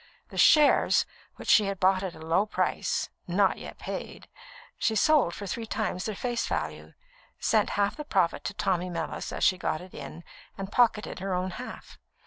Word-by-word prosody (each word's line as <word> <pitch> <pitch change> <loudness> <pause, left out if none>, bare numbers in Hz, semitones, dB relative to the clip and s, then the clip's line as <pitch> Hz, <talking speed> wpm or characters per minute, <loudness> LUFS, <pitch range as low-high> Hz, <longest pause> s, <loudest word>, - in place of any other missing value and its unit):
The - - -10
shares 300 -2 +5 0.3
which - - -10
she 210 - +6
had 195 -1 -3
bought 185 0 +3
at 190 -3 -4
a - - -12
low 180 +6 +2
price - - -1 0.2
not - - +2
yet - - -9
paid - - -7 0.5
she 220 - +1
sold 255 - +3
for 205 - -6
three 225 +4 -4
times 215 -4 -2
their 215 - -3
face 240 +2 -2
value, - - -4 0.4
sent 215 -2 +2
half 200 +4 +1
the 300 - -4
profit 175 - +1
to 200 - -3
Tommy 180 -2 0
Mellis 165 -2 -4
as - - -3
she 185 - +4
got 155 - -1
it 180 +1 -12
in, 170 - -8 0.3
and 195 0 -6
pocketed 225 -4 +2
her 190 0 -2
own 185 +1 -2
half. 250 +7 -9
195 Hz, 185 wpm, -28 LUFS, 180-220 Hz, 0.5 s, she